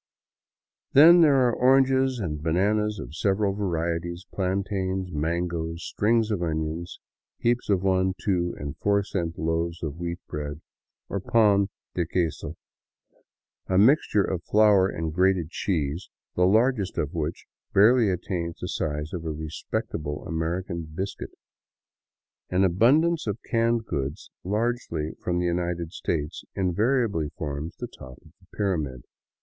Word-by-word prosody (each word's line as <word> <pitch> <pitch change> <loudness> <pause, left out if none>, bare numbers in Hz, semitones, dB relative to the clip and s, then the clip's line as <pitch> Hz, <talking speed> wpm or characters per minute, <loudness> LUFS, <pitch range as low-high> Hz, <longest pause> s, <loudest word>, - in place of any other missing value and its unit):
Then 170 +5 +9
there 135 -5 +5
are 120 - +1
oranges 130 +1 +3
and 80 -9 -3
bananas 105 +6 +1
of 85 - -8
several 100 +3 +1
varieties, 85 -2 -2
plantains, 95 -1 -1
mangoes, 85 +1 -2
strings 110 +1 +1
of 100 -4 -1
onions, 80 +1 -3 0.4
heaps 120 0 0
of 95 -2 +2
one, 95 -1 +2
two, 90 -4 0
and 70 -1 -5
four 100 0 +2
cent 85 -4 -3
loaves 85 +1 -2
of 75 -1 -4
wheat 85 0 -3
bread, 75 0 -5 0.5
or 100 - -3
pan 100 -1 +3 0.2
de 85 -2 -1
queso, 85 -2 -2 0.6
— - - -41
a 95 - +1
mixture 105 -1 +4
of 90 -3 -3
flour 105 -3 +5
and 80 -3 -3
grated 90 -2 +2
cheese 85 -3 -2
— - - -59
the 90 0 +4
largest 110 -1 +2
of 75 - -1
which 80 0 -3 0.3
barely 115 +2 +5
attains 90 -2 -3
the - - -4
size 75 0 -3
of 85 -3 -4
a 80 - -3
respectable 75 -1 -4
American 85 +1 -2
biscuit. 95 +3 -5 1.2
An 90 +1 +2
abundance 135 - +3
of 105 0 -1
canned 115 0 +2
goods, 70 -5 -4
largely 105 -6 -1
from 90 -1 0
the 90 - 0
United 85 -1 -1
States, 75 -3 -3
invariably 100 - +1
forms 75 +2 -4
the - - -5
top 65 -1 -12
of - - -17
the - - -21
pyramid. 75 - -1
90 Hz, 140 wpm, -26 LUFS, 80-105 Hz, 1.2 s, Then